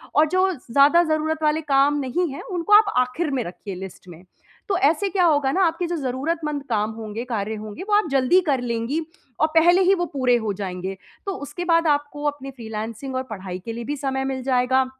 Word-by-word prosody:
और 305 +2 +5
जो 370 +2 +2 0.2
ज़्यादा 285 +7 +6
ज़रूरत 315 0 -1
वाले 305 +1 +2
काम 280 +2 +4
नहीं 285 +6 -1
हैं, 280 - -7
उनको 360 +2 -1
आप 420 -1 +3
आखिर 255 +6 0
में 260 -3 -1
रखिए 185 +2 -7
लिस्ट 185 0 -9
में। 170 0 -12 0.5
तो 390 - +2
ऐसे 325 +6 +2
क्या 375 -1 +1
होगा 290 -5 +3
ना, 380 +6 +2
आपके 335 +2 -2
जो 345 - -2
ज़रूरतमंद 295 +2 -2
काम 210 +1 0
होंगे, 220 0 -6
कार्य 220 -3 -3
होंगे, 215 - -7
वो - - +1
आप 420 - +1
जल्दी 270 +6 +4
कर 270 -3 +2
लेंगी 240 +5 -2 0.4
और 310 - +4
पहले 350 +3 +6
ही 375 +1 +5
वो 350 -1 -1
पूरे 255 -3 +3
हो 205 - 0
जाएँगे। 190 -1 -5 0.3
तो 395 - -2
उसके 325 +5 -6
बाद 330 0 +4
आपको 290 0 0
अपनी 275 -1 -9
फ़्रीलांसिंग 230 +1 -6
और 260 - -1
पढ़ाई 185 -3 -6
के 230 - -4
लिए 235 +1 -5
भी 290 - -2
समय 265 -1 -2
मिल 260 -1 -5
जाएगा 260 0 +2
275 Hz, 210 wpm, -23 LUFS, 230-320 Hz, 0.5 s, ज़्यादा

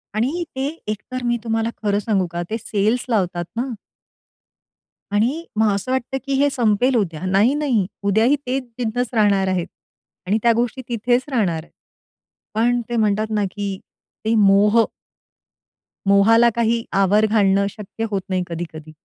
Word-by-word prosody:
आणि 270 +11 0
ते 265 +1 -1 0.2
एकतर 215 +4 -4
मी 240 0 +1
तुम्हाला 225 0 0
खरं 205 -1 +1
सांगू 200 -3 0
का 175 - -3
ते 220 - -1
सेल्स 220 +2 0
लावतात 180 -6 0
ना. 240 +3 -1 1.4
आणि 240 +11 +1
मग 220 -1 +3
असं 200 +6 -3
वाटतं, 260 0 -1
की 275 - -2
हे 285 +1 +4
संपेल 245 -1 +2
उद्या. 170 -9 -1
नाही, 200 +7 +3
नाही 275 -9 +1 0.2
उद्याही 220 +7 +3
ते 255 +2 0
तिथेच 245 -1 -3
राहणार 200 -4 +3
आहेत. 185 -2 -1 0.6
आणि 205 +3 +2
त्या 235 - +5
गोष्टी 245 +2 -1
तिथेच 245 +2 +1
राहणार. 175 -10 0 0.9
पण 240 +2 +2
ते 240 - -2
म्हणतात 215 0 +1
ना, 210 - +1
की 200 -1 -4 0.5
ते 220 - +2
मोह. 210 +2 +5 1.2
मोहाला 225 +4 +5
काही 230 0 +1
आवर 195 +2 +4
घालणं 200 -2 +3
शक्य 210 +2 -6
होत 200 -2 -1
नाही 185 -1 0
कधी-कधी. 160 -2 -7
220 Hz, 150 wpm, -21 LUFS, 200-240 Hz, 1.4 s, त्या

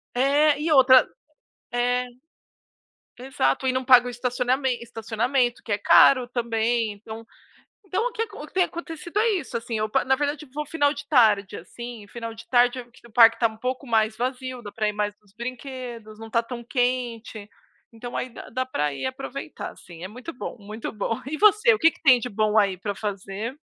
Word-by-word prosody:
É, 285 +3 +3
e 315 +1 -1
outra 260 -2 +7 0.7
é, 245 +1 +1 1.1
exato, 255 - -1
e 255 - +2
não 260 0 -2
pago 250 -1 +7
o - - -3
estacionamen 250 +1 -1
estacionamento, 235 +2 -1
que 215 - -4
é 205 - +1
caro 250 +4 +6
também, 230 -2 0
então 220 +2 -10 0.6
então 390 +5 -1
o - - -6
que 455 - -2
o 295 - -8
que - - -19
tem 370 -1 +3
acontecido 340 +2 -6
é 455 +1 +3
isso, 325 - -2
assim, 230 -1 -4
eu 215 0 -1
pa - - +1
na 265 0 +3
verdade, 290 +1 -2
eu - - -23
vou 300 0 -3
final 290 -1 +1
de 285 0 -9
tarde, 215 -9 +3
assim, 230 +4 -9
final 230 -1 -7
de 225 - -13
tarde 245 0 +3 0.3
o 235 - -16
parque 230 0 +6
tá 230 - +4
um 220 0 -12
pouco 255 +2 -4
mais 220 -1 +2
vazio, 255 0 -4
dá 205 -2 -9
pra 215 0 -1
ir - - -4
mais 210 0 -2
nos 200 -1 -27
brinquedos, 240 -2 -7
não 225 0 -9
tá 230 +1 +1
tão 235 0 -7
quente, 240 -4 -2 0.4
então 240 +2 -8
aí 255 - -2
dá 230 - -11
dá 255 +2 -2
pra 150 - -2
ir 140 - -5
aproveitar, 270 +2 -6
assim, 170 0 -13
é - - -4
muito 250 +10 -9
bom, 245 - -7
muito 210 +2 -7
bom 220 +1 -3
e 305 +3 -4
você, 425 +3 +5
o 430 - -2
que 330 - +6
que - - -22
tem 255 -4 +7
de 245 - -5
bom 215 +1 +1
aí 195 -3 +1
pra 205 +2 -4
fazer? 205 +5 -5
245 Hz, 200 wpm, -24 LUFS, 220-265 Hz, 1.1 s, outra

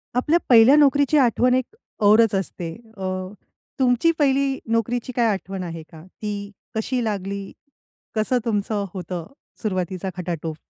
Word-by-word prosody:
आपल्या 305 +7 +3
पहिल्या 240 +3 +8
नोकरीची 285 0 +4
आठवण 250 -1 +3
एक 260 - -2 0.3
औरच 215 +1 +6
असते. 180 -3 -3 0.3
अ, - - -10 0.8
तुमची 255 +5 +3
पहिली 275 -1 +2
नोकरीची 230 +2 0
काय 235 -2 +3
आठवण 190 -1 -5
आहे 165 -2 -6
का? 160 -1 -12
ती 200 +1 -6 0.2
कशी 245 +3 -1
लागली? 200 -2 -3 0.6
कसं 220 +4 +1
तुमचं 205 -2 -1
होतं 180 -2 -5 0.4
सुरुवातीचा 185 -3 -2
खटाटोप? 165 -3 -4
215 Hz, 130 wpm, -23 LUFS, 190-255 Hz, 0.8 s, पहिल्या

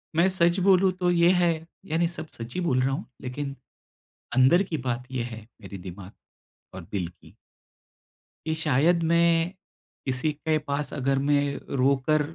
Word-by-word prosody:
मैं 170 +3 +5
सच 175 0 +2
बोलूँ, 190 0 +4
तो 180 -1 -1
ये 170 0 +4
है, 175 -2 +3 0.4
यानी 165 +1 +1
सब 165 -1 -6
सच्च 115 +1 -7
ही - - -2
बोल 130 -7 +1
रहा 135 - +1
हूँ, 145 +8 -3 0.2
लेकिन 135 +2 -5 0.8
अंदर 130 +9 +5
की 170 -4 -3
बात 120 +1 -2
ये 125 - -1
है, 115 -2 -8
मेरे 100 - -9
दिमाग 95 +2 -9 0.6
और 95 - -7
दिल 90 -4 -2
की 85 - -19 1.1
कि 160 - 0
शायद 160 +3 +2
मैं 170 0 +3 0.6
किसी 130 +4 0
के 155 +1 0
पास 145 -1 -3
अगर 135 0 0
मैं 145 +1 +2 0.4
रोकर 140 +3 +2
150 Hz, 160 wpm, -26 LUFS, 130-170 Hz, 1.1 s, मैं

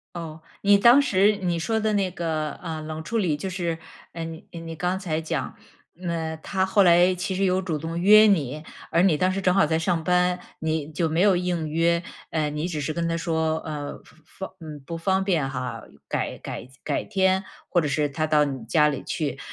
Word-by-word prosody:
哦， 160 -2 -7 0.2
你 200 0 +6
当 240 +7 +7
时 205 -5 +3
你 175 -3 -1
说 220 +7 0
的 215 -1 0
那 195 -3 +1
个， 160 -3 -2
呃， 160 -2 -6
冷 155 0 -6
处 230 +7 -2
理 165 -8 +1
就 190 +5 -4
是， 170 -3 -2 0.3
呃， 165 -1 -5
你 165 0 -8
你 165 -1 -7
刚 180 +4 -1
才 160 -4 -2
讲， 160 -5 -3 0.5
嗯， 165 -2 -3
他 190 -1 0
后 195 +1 +4
来 175 +1 +5
其 180 +1 -3
实 195 +1 +1
有 185 0 +2
主 170 -5 -2
动 165 +3 -5
约 215 +4 +8
你， 155 -7 +1 0.3
而 165 - +3
你 185 -5 +4
当 185 +5 +2
时 195 - -2
正 185 -1 +2
好 195 - +5
在 160 +1 0
上 165 -1 0
班， 180 +1 +2 0.2
你 160 -1 -2
就 160 +2 0
没 160 +3 0
有 195 -3 +5
应 175 -3 -2
约。 170 +2 +2 0.3
呃， 155 -2 0
你 150 +3 -3
只 155 -4 -3
是 150 - -2
跟 170 +1 -2
他 165 - 0
说， 160 -1 0
呃， 150 -3 -6 0.2
方 190 - -9
嗯， 150 -3 -9
不 165 -1 -5
方 190 +2 +1
便 165 -8 +1
哈， 125 -1 -4 0.3
改 - - -2
改 125 - -7 0.2
改 - - -1
天 190 -1 +1 0.2
或 175 - +3
者 150 - 0
是 145 +1 0
他 155 +3 -1
到 150 -1 +4
你 135 -5 -4
家 150 +5 +4
里 140 - -3
去。 150 -3 -3
165 Hz, 225 characters per minute, -25 LUFS, 155-185 Hz, 0.5 s, 约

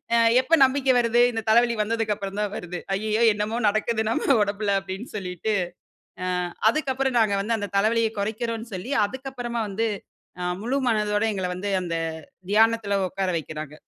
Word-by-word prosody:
அ, - - +5 0.2
எப்ப 315 +6 +3
நம்பிக்கை 265 0 +2
வருது? 240 0 +3
இந்த 225 -2 -3
தலைவலி 235 +2 +4
வந்ததுக்கு 220 0 0
அப்பறம் 200 0 -5
தான் 210 -1 -1
வருது. 180 0 -6 0.2
ஐய்யயோ! 215 +3 0
என்னமோ, 210 +2 -2
நடக்குது 220 +2 0
நம்ம 265 +3 +2
உடம்புல 200 0 0
அப்டின்னு 195 +5 -8
சொல்லிட்டு, 185 +2 -3 0.7
அ - - -2 0.4
அதுக்கப்றம் 265 -1 0
நாங்க 215 -3 +3
வந்து 225 +3 0
அந்த 205 -1 -4
தலைவலியக் 225 +1 +1
குறைக்கிறோன்னு 225 +2 -3
சொல்லி, 185 +9 -6
அதுக்கப்பறமா 245 0 -5
வந்து 225 +4 -1 0.5
அ - - -2 0.2
முழு 245 +4 -1
மனதோட 210 -1 +1
எங்கள 190 -2 -2
வந்து 200 +3 -4
அந்த 170 -1 -3 0.6
தியானத்ல 220 -1 +3
உட்கார 190 +1 -2
வைக்கிறாங்க. 155 -2 -6
220 Hz, 155 wpm, -24 LUFS, 200-235 Hz, 0.7 s, அ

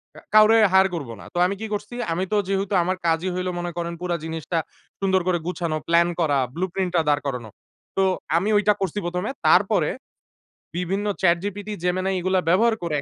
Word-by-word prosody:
কা - - -11 0.2
কাউরে, 215 +1 +7 0.2
হায়ার 190 0 +6
করব 145 -8 -5
না। - - -11
তো - - -5
আমি 190 +2 -1
কি - - -3
করছি? 210 +4 -5 0.2
আমি 180 +3 0
তো 210 - +2
যেহেতু 195 +1 -1
আমার 185 +1 -1
কাজই 165 +2 +1
হইলো 185 0 -2
মনে 175 0 -3
করেন, 170 0 -3
পুরা 180 -1 -1
জিনিসটা 160 +1 -3 0.4
সুন্দর 190 -1 +2
করে 180 -1 +2
গুছানো, 170 -3 -2
প্লান 170 +1 +4
করা, 150 -4 +2 0.2
ব্লুপ্রিন্ট 185 +1 -2
টা 165 - +4
দাঁড় 145 0 +2
করানো। 125 -5 -4 0.5
তো 195 - +4 0.3
আমি 195 +5 0
ঐটা 210 0 +4
করছি 190 0 -2
প্রথমে। 180 +1 -2 0.2
তারপরে - - +4 0.9
বিভিন্ন 190 +4 -2 0.2
ChatGPT, 195 +4 0
Gemini 185 +2 0
এগুলো 185 +1 +1
ব্যবহার 220 +6 +4
করে 150 -3 -1
180 Hz, 185 wpm, -23 LUFS, 170-195 Hz, 0.9 s, কাউরে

